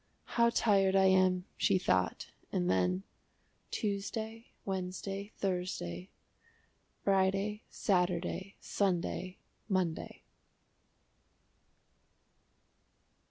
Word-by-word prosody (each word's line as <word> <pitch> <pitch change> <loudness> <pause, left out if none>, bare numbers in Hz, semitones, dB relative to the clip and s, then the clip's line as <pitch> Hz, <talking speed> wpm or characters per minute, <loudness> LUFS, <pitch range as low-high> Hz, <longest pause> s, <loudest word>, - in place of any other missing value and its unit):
"How 235 0 +5
tired 195 -4 +3
I 190 0 +6
am!" 185 -1 +4
she 195 - +3
thought, 95 - 0 0.2
and 90 +1 +1
then 90 0 +2 0.7
"Tuesday, 220 +2 -3 0.2
Wednesday, 195 +2 -3
Thursday 180 - -2 0.9
Friday, 195 +2 +2
Saturday, 180 0 0
Sunday, 185 -1 -1 0.3
Monday." 185 -4 -1
190 Hz, 70 wpm, -33 LUFS, 180-200 Hz, 0.9 s, I